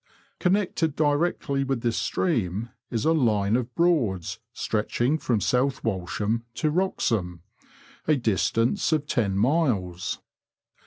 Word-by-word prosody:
Connected 180 -5 +1
directly 145 -2 +1
with 135 -3 -1
this 115 -2 0
stream 115 - -1 0.2
is 115 -2 -2
a 160 - +4
line 110 -8 +2
of 125 -1 -2
Broads 125 - +1
stretching 120 +7 0
from 120 -7 +1
South 125 +6 +1
Walsham 105 +2 -1
to 155 - 0
Wroxham 115 - 0 0.3
— - - -26
a 155 - +5
distance 115 - +1
of 150 -2 +1
ten 105 -9 0
miles. 105 - 0
120 Hz, 120 wpm, -26 LUFS, 105-155 Hz, 0.3 s, a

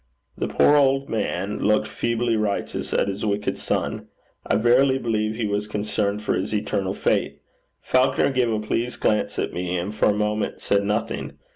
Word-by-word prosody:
The - - -2
poor 145 - +4
old 135 -1 +2
man 100 -2 -2
looked 105 +1 +2
feebly 115 +1 0
righteous 105 -2 -2
at - - +1
his 100 0 -4
wicked 105 -1 -1
son. - - -2 0.4
I - - +2
verily 130 +4 +4
believe 110 -3 -1
he 115 -1 -2
was 105 0 -1
concerned 105 0 -2
for - - 0
his 100 +3 -2
eternal 100 -2 -1
fate. - - 0 0.4
Falconer 130 +2 +2
gave 125 -3 +1
a 110 - 0
pleased 115 +3 -2
glance 105 - 0
at - - -2
me, 90 0 -2
and 90 +4 -3
for 105 - +2
a - - +3
moment 105 0 -1
said 100 0 +1
nothing. 105 +1 -2
105 Hz, 175 wpm, -23 LUFS, 105-120 Hz, 0.4 s, poor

